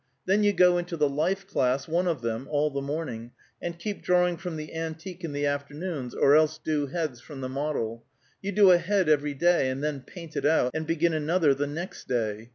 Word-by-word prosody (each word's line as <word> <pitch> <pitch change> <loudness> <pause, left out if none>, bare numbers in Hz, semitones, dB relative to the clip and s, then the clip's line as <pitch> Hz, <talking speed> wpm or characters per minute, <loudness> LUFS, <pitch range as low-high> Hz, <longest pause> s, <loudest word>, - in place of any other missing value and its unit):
Then 195 +3 +3
you 205 - +5
go 180 -2 +4
into 175 -1 -4
the 150 -1 +3
life 170 +8 -1
class, 130 -6 0
one 175 +3 +1
of 160 -7 -1
them, 115 +3 -3
all 150 0 +1
the 140 0 -3
morning, 135 -5 -5 0.3
and 170 -1 -4
keep 205 +4 -5
drawing 180 -1 +3
from 175 -1 -6
the 155 0 -7
antique 165 +3 -6
in 165 - -3
the 145 0 -1
afternoons, 145 -1 -3
or 140 +1 +5
else 155 0 +3
do 150 -2 -1
heads 145 -5 -3
from 140 -2 -9
the 130 - -3
model. 130 -5 -3 0.4
You 200 - -3
do 200 -1 +6
a 175 - +6
head 190 0 +1
every 145 -1 +2
day, 170 -2 +3
and 130 +2 -3
then 150 -2 -1
paint 165 +2 -11
it - - -2
out, 145 -4 +3
and 160 0 -3
begin 165 0 +1
another 155 0 +2
the 145 +2 -2
next 165 +6 -6
day. 110 -2 -2
155 Hz, 220 wpm, -27 LUFS, 140-175 Hz, 0.4 s, do